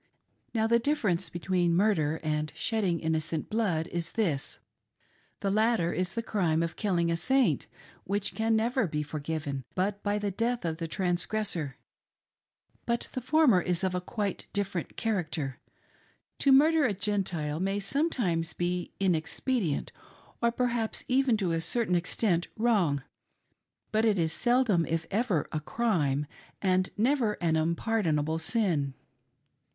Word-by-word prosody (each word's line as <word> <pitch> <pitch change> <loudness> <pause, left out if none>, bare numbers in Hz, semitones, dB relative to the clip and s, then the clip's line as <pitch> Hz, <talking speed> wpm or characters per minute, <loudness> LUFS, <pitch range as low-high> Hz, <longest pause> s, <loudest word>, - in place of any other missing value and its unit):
Now 220 -1 +2
the 235 +1 +4
difference 205 - 0
between 175 -1 0
murder 170 -6 +2
and 155 0 -1
shedding 195 -7 0
innocent 160 +2 -2
blood 200 -8 +1
is 170 -1 -3
this: 165 -12 -1 0.4
— - - -38
the 195 - 0
latter 215 -5 +2
is 185 +2 -2
the 230 - -1
crime 170 -7 +1
of 165 0 -3
killing 175 -5 +1
a - - +2
Saint, 265 +10 +2 0.4
which 200 0 -2
can 225 0 +1
never 230 0 +1
be 150 -1 -2
forgiven, 145 -2 -4
but 200 +2 -1
by 205 0 0
the 205 -1 -1
death 235 +1 -1
of 160 -1 -1
the 165 -1 -3
transgressor; 175 -3 -1 1.1
but 235 0 -1
the 255 - -3
former 260 - +4
is 175 0 -1
of 185 -1 +1
quite 205 -5 -2
a - - -35
different 195 -4 -2
character. 160 - -2 0.8
To 275 - +4
murder 305 +4 +6
a 220 -7 +1
Gentile 180 -7 -1
may 195 +2 0
sometimes 200 - 0
be 175 0 -2
inexpedient, 180 - 0 0.5
or 235 0 +3
perhaps 235 -2 -1
even 255 -3 +3
to 190 -5 0
a 165 0 0
certain 220 +3 0
extent 175 0 +1
wrong, 195 - +2 0.9
but 220 +1 +2
it 215 -3 +3
is 160 -2 +1
seldom, 240 -8 +3
if 165 0 -1
ever, 205 - +1
a 155 - -1
df'ime, 150 - 0 0.3
and 185 -1 +2
never 235 -1 +2
an 170 -5 0
unpardonable 160 -2 0
sin. 160 - 0
185 Hz, 145 wpm, -29 LUFS, 165-225 Hz, 1.1 s, murder